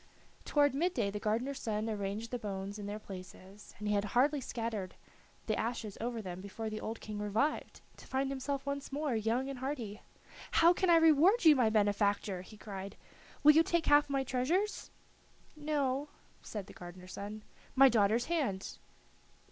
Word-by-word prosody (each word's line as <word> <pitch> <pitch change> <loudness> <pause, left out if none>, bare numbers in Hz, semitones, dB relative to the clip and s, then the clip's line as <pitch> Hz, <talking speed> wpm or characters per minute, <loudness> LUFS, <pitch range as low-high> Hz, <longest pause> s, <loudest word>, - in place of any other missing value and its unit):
Toward 290 -2 +3
mid 345 +6 0
day 205 -5 0
the 210 - -4
gardener's 235 +6 -1
son 215 0 -2
arranged 210 +1 -3
the 245 - -2
bones 200 -1 -5
in 205 - -5
their 205 +1 -4
places, 190 0 -11
and 210 - -5
he 210 - +2
had 200 -1 +2
hardly 285 +2 +3
scattered 225 -6 -4 0.5
the 215 - 0
ashes 225 -3 -3
over 230 -1 -3
them 180 -1 -6
before 215 +3 -5
the 215 - -5
old 225 +1 -4
King 210 -1 -6
revived, 215 +9 -1 0.2
to - - -14
find 270 +1 -1
himself 275 +1 -3
once 280 0 -4
more 285 -2 -1
young 225 +4 0
and 275 -2 -5
hearty. 250 -6 -4 0.5
"How 335 +2 +6
can 370 0 0
I 340 - +7
reward 325 +6 +5
you, 310 -2 +9
my 245 -4 +3
benefactor?" 205 -2 +1
he 210 +4 -13
cried. 195 -1 -7 0.5
"Will 300 - +10
you 315 +2 +6
take 335 0 +1
half 290 0 +5
my 275 -1 +1
treasures?" 310 +12 -1 0.7
"No," 290 -2 -1 0.3
said 205 -3 -6
the - - -13
gardener's 180 +1 -10
son. 210 +1 -6 0.3
"My 270 0 +8
daughter's 225 0 +3
hand?" 275 - -2
230 Hz, 175 wpm, -33 LUFS, 205-280 Hz, 0.7 s, Will